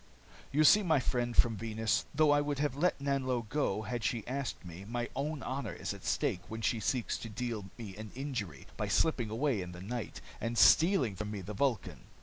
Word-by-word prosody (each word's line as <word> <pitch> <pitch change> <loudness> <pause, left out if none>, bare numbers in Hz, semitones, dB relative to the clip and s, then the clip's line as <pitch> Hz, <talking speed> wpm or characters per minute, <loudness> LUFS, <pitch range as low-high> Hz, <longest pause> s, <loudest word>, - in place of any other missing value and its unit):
"You 150 +3 +4
see, 210 +8 +8
my 160 -7 +3
friend 120 -2 -1
from 115 -2 +4
Venus, 110 -1 0
though 155 0 +4
I 145 0 +5
would 145 -1 -2
have 145 -2 0
let 175 +3 +1
Nanlo 130 -4 0
go 110 -5 0
had 120 +2 -3
she 115 -2 -1
asked 135 -6 -4
me, 90 +2 -8
my 120 +3 -3
own 145 +1 -2
honor 135 +2 -3
is - - -4
at - - -11
stake 90 - +1
when 110 0 -6
she 115 +1 +1
seeks 120 +2 -1
to 115 - -6
deal 115 -2 -3
me 105 -6 -7
an 110 0 -7
injury 120 - -4
by - - -1
slipping 125 -9 +2
away 115 -1 0
in 90 -1 -6
the 90 - -9
night, 115 +3 -5 0.2
and 115 0 -2
stealing 130 - +5
from 105 +2 -4
me 105 -2 -4
the 100 +4 -6
Vulcan. 120 -2 -1
120 Hz, 210 wpm, -32 LUFS, 105-140 Hz, 0.2 s, see